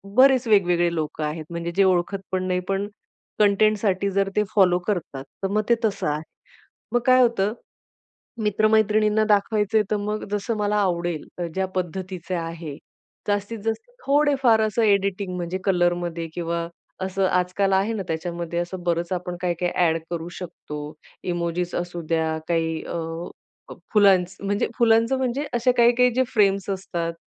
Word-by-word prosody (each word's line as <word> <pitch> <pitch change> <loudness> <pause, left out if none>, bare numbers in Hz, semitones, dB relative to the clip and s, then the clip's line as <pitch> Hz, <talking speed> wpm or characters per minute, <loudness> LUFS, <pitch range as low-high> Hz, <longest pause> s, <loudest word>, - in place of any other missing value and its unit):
बरेच 260 -1 +5
वेगवेगळे 175 -5 +3
लोकं 155 0 -3
आहेत. 155 +1 -4
म्हणजे 170 0 -4
जे 195 - +5
ओळखत 185 +1 +1
पण 185 0 0
नाही 180 0 +1
पण 195 +1 0 0.5
कंटेंटसाठी 200 -1 +3
जर 195 0 +1
ते 210 - +3
फॉलो 180 -3 +5
करतात, 160 -9 -2 0.2
तर - - +2
मग 210 +2 +1
ते 235 - +6
तसं 200 -6 -1
आहे. 150 +1 -1 0.7
मग 240 - +4
काय 255 0 +6
होतं, 220 -3 +2 0.9
मित्र-मैत्रिणींना 215 0 +3
दाखवायचंय 210 +1 +2
तर 210 - +2
मग 210 +1 -3
जसं 210 +2 -1
मला 210 0 0
आवडेल 175 -5 0 0.3
ज्या 190 0 0
पद्धतीचे 185 0 -4
आहे 165 -3 -5 0.5
जास्तीत 205 +2 -1
जास्त 450 - -3 0.2
थोडे-फार 275 -5 +4
असं 215 +2 +1
एडिटिंग 200 -2 +1
म्हणजे 175 +1 -3
कलर 175 -3 +3
मध्ये 170 -1 -4
किंवा 170 -1 -2 0.4
असं 190 0 0
आजकाल 180 +2 +1
आहे 195 +4 +2
ना, 210 - -2
त्याच्यामध्ये 170 +1 -3
असं 175 +1 -4
बरंच 170 +1 -1
आपण 180 0 -3
काय-काय 175 0 -1
ॲड 165 -2 +2
करू 170 -1 -4
शकतो. 160 -4 -8 0.5
इमोजिस 175 0 -2
असू 175 -1 -3
द्या, 160 -1 0
काही 165 -1 0
अ, - - -5 0.7
फ - - -7 0.2
फुलांचं 190 -2 +4
म्हणजे 205 +1 0
फुलांचं 230 +2 +4
म्हणजे 265 +3 -1
असे 240 +1 +3
काही 235 0 +6
काही 250 0 +5
जे 260 - +3
फ्रेम्स 200 -2 +2
असतात 175 -3 -3
190 Hz, 155 wpm, -24 LUFS, 175-210 Hz, 0.9 s, ते